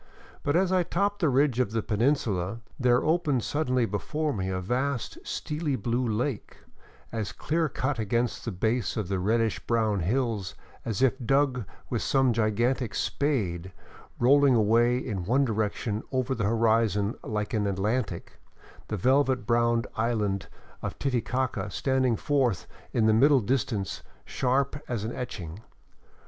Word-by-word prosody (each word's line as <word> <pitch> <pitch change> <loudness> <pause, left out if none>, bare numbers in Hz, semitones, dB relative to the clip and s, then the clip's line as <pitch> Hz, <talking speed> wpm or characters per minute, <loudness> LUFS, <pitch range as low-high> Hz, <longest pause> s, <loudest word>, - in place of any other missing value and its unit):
But 145 - 0
as 185 +1 +3
I 185 -1 +4
topped 200 +4 0
the 165 -6 +3
ridge 135 -1 +2
of 110 -4 0
the 115 -2 0
peninsula, 110 -4 0 0.2
there 125 -1 +3
opened 155 -6 +1
suddenly 130 -5 +1
before 150 +9 -2
me 95 -2 -2
the 95 0 -1
vast 125 - -2
steely 150 - -2
blue 120 +2 -1
lake, 115 +2 -2 0.5
as 110 -3 -3
clear 160 0 -1
cut 130 0 -2
against 115 +2 -1
the 115 - -3
base 110 +7 -1
of 105 -4 -2
the 95 -1 0
reddish 110 +3 +1
brown 110 -3 +1
hills 110 0 -1 0.3
as 115 +1 -1
if 130 0 +2
dug 135 -2 +2 0.3
with - - 0
some 135 -3 +2
gigantic 115 +1 0
spade, 95 - -1 0.4
rolling 140 +1 +5
away 115 +3 +4
in 105 -8 -3
one 130 +7 +3
direction 110 -1 -1
over 130 0 0
the 115 -5 -1
horizon 110 -1 +2
like 105 -1 -3
an 105 -2 +1
Atlantic, 100 0 -2 0.5
the 110 - -3
velvet 130 +4 +2
brown 120 -1 +2
island 105 -4 0 0.3
of - - -5
Titicaca 130 0 -1
standing 130 -3 +1
forth 130 - 0 0.3
in 115 - +2
the 110 - +5
middle 135 +5 +5
distance 110 -4 -1 0.2
sharp 140 +2 0
as 120 -4 -2
an 110 - -3
etching. 95 -9 -6
120 Hz, 145 wpm, -27 LUFS, 105-135 Hz, 0.5 s, rolling